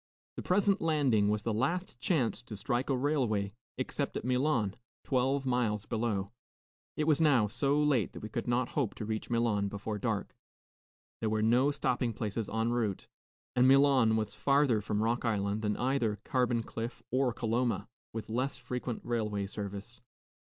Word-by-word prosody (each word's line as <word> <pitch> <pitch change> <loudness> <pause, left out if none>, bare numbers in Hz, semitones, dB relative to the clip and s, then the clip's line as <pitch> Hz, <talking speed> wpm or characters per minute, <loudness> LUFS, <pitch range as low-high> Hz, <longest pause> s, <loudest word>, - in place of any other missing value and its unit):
The - - -5
present 200 +2 +2
landing 135 -10 +3
was 105 0 0
the 115 - 0
last 135 - -1
chance 130 -5 +1
to 120 -4 -8
strike 120 +5 -1
a 135 - +2
railway, 120 -8 0 0.2
except - - -2
at - - -5
Milan, 125 -5 +1 0.3
twelve 135 +1 +1
miles 115 -5 0
below. 110 -4 -1 0.7
It 155 - +1
was 155 0 +3
now 140 -8 +5
so 140 +7 +1
late 145 -8 +2
that - - -8
we - - -3
could - - -4
not 120 0 +1
hope 135 -8 -1
to 110 - -5
reach 110 0 -3
Milan 115 -4 +1
before 105 +1 -4
dark; - - -2 0.8
there 110 - 0
were 110 0 +1
no 125 +5 +4
stopping 125 -4 0
places 110 0 -3
en 110 +1 0
route, 110 -5 -1 0.5
and 125 +1 +5
Milan 135 -4 +5
was 110 -1 -1
farther 140 -6 +3
from 105 +1 -1
Rock 115 +2 0
Island 105 -2 0
than 105 -1 -1
either 120 -4 0
Carbon 120 -3 +1
Cliff 115 +1 -6
or 130 0 +2
Coloma, 115 -1 -1 0.2
with 115 -1 -5
less 125 +4 -1
frequent 125 -1 -4
railway 105 -4 -1
service. 100 +3 -7
120 Hz, 165 wpm, -31 LUFS, 110-130 Hz, 0.8 s, now